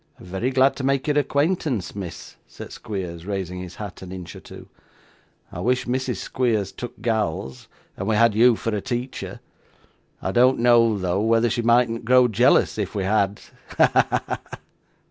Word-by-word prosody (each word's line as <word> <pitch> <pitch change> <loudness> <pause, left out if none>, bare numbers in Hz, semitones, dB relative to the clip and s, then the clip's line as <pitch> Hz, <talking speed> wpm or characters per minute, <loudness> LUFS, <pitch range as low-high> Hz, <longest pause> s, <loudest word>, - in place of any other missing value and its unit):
'Very 95 +4 -3
glad 135 +1 +3
to 140 - -6
make 135 0 +1
your 150 -1 +2
acquaintance, 145 - -1
miss,' 95 -4 -8
said - - -10
Squeers, 90 -4 -6
raising 95 -3 -4
his 90 -1 -8
hat 105 -3 -8
an 95 -1 -9
inch 90 -2 -8
or - - -9
two. - - -12 0.8
'I - - -7
wish 125 +2 0
Mrs. 130 0 -1
Squeers 110 -6 -1
took 120 0 -8
gals, 95 - -2 0.3
and 95 - -5
we 110 - +2
had 115 0 +4
you 120 +2 +5
for 110 0 -3
a 105 - -2
teacher. 125 +4 -5 0.8
I 95 - -3
don't 125 +4 +4
know, 115 -2 +4
though, 90 +1 -1
whether 115 +1 +2
she 120 - 0
mightn't 115 0 +2
grow 125 +1 +5
jealous 115 0 +3
if 100 0 -3
we 100 - -1
had. 100 0 +1 0.4
Ha! - - +5 0.2
ha! - - -1
ha! - - -6
115 Hz, 175 wpm, -23 LUFS, 95-125 Hz, 0.8 s, you